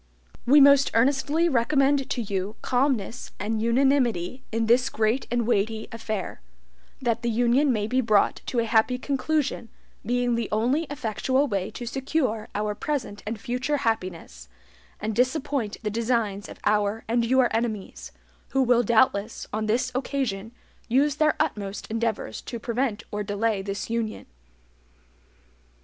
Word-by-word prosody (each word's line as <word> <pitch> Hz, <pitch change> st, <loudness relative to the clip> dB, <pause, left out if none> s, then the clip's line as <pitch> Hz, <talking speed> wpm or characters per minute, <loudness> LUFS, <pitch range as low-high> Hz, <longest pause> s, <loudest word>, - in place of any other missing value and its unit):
"We 285 Hz, +4 st, +7 dB
most 280 Hz, -1 st, +7 dB
earnestly 280 Hz, +7 st, +2 dB
recommend 275 Hz, 0 st, +2 dB
to 245 Hz, -, -1 dB
you 200 Hz, 0 st, -3 dB
calmness 250 Hz, -3 st, 0 dB
and 215 Hz, +2 st, -2 dB
unanimity 250 Hz, -3 st, +1 dB
in 225 Hz, 0 st, 0 dB
this 240 Hz, +3 st, +3 dB
great 220 Hz, +4 st, 0 dB
and 240 Hz, -1 st, 0 dB
weighty 220 Hz, 0 st, 0 dB
affair, 215 Hz, -, -5 dB, 0.6 s
that 235 Hz, -2 st, 0 dB
the 240 Hz, -, -1 dB
union 245 Hz, +5 st, +3 dB
may 215 Hz, -4 st, 0 dB
be 255 Hz, +4 st, +1 dB
brought 215 Hz, -4 st, +2 dB
to 250 Hz, -, -3 dB
a 230 Hz, -, +2 dB
happy 230 Hz, +2 st, +2 dB
conclusion, 275 Hz, -2 st, -1 dB, 0.3 s
being 245 Hz, +2 st, 0 dB
the 230 Hz, -2 st, -1 dB
only 250 Hz, +9 st, +1 dB
EFFECTUAL 260 Hz, +1 st, 0 dB
way 195 Hz, -5 st, -2 dB
to 240 Hz, -, -7 dB
secure 260 Hz, -3 st, -1 dB
our 210 Hz, 0 st, -1 dB
present 235 Hz, -4 st, -3 dB
and 220 Hz, 0 st, -3 dB
future 255 Hz, +5 st, -1 dB
happiness, 180 Hz, -, -3 dB, 0.5 s
and 215 Hz, 0 st, -3 dB
disappoint 255 Hz, -3 st, 0 dB
the 210 Hz, -, -1 dB
designs 225 Hz, -3 st, -1 dB
of -, -, -10 dB
our 210 Hz, +1 st, +1 dB
and 235 Hz, +1 st, +1 dB
your 250 Hz, 0 st, +3 dB
enemies, 225 Hz, -4 st, -3 dB, 0.4 s
who 270 Hz, 0 st, +3 dB
will 245 Hz, -1 st, +4 dB
doubtless, 225 Hz, -2 st, +2 dB
on 215 Hz, 0 st, -1 dB
this 250 Hz, +4 st, +1 dB
occasion, 250 Hz, -6 st, -2 dB, 0.4 s
USE 275 Hz, +5 st, +3 dB
THEIR 305 Hz, 0 st, +3 dB
UTMOST 200 Hz, 0 st, -3 dB
ENDEAVORS 225 Hz, -1 st, -2 dB
TO 235 Hz, -, -6 dB
PREVENT 235 Hz, -3 st, -2 dB
OR 210 Hz, -, -2 dB
DELAY 205 Hz, 0 st, -1 dB
THIS 200 Hz, +3 st, -5 dB
UNION." 230 Hz, -2 st, -2 dB
235 Hz, 145 wpm, -25 LUFS, 215-260 Hz, 0.6 s, We